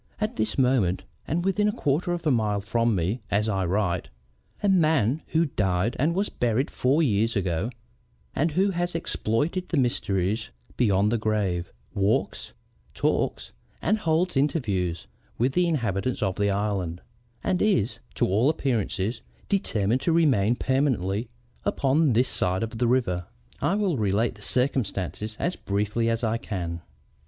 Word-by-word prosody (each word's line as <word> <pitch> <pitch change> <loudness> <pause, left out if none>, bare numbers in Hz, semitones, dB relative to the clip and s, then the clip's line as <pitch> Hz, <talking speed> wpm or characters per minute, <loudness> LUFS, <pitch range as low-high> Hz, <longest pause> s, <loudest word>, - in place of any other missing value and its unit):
At 215 0 -1
this 110 0 -1
moment 125 -9 +2 0.2
and 175 +4 -1
within 205 +2 +2
a - - +3
quarter 165 0 0
of 175 -1 -3
a 150 - +3
mile 105 -4 +1
from 115 +2 +1
me 95 +7 -1
as 105 +2 +1
I 95 -3 0
write, 95 -1 0 0.5
a - - +3
man 155 - +3
who 165 +1 +2
died 100 - 0
and 160 +5 +2
was 200 +2 +1
buried 120 +3 0
four 140 +6 +2
years 115 -3 +1
ago, 95 +1 0 0.7
and 160 +5 +2
who 195 +4 +2
has 175 -1 -2
exploited 165 - -1
the 170 - 0
mysteries 105 -4 0 0.3
beyond 105 -3 +3
the 115 - +1
grave, 100 -5 -1 0.2
walks, 100 +2 0 0.4
talks, - - 0 0.3
and 215 +2 +1
holds 170 -1 +1
interviews 105 - 0 0.3
with 130 +3 +1
the 180 +2 +3
inhabitants 120 - -1
of 95 -2 0
the 100 0 +1
island, 100 -4 -1 0.4
and 180 - 0
is, 125 - +1 0.2
to - - +2
all 110 +9 +3
appearances, 115 -7 -1 0.3
determined 120 - +1
to 170 - +1
remain 130 -10 +3
permanently 120 -6 0 0.3
upon 140 0 +2
this 125 +3 +3
side 90 -1 0
of 115 0 -5
the 120 - +2
river. 95 -9 +1 0.4
I 195 - +2
will 200 -7 +1
relate 105 +2 +1
the 105 - -17
circumstances 110 -4 -1
as 175 - -1
briefly 105 +3 -1
as 115 +1 -1
I 115 0 +1
can." 85 -6 -4
115 Hz, 155 wpm, -26 LUFS, 100-150 Hz, 0.7 s, a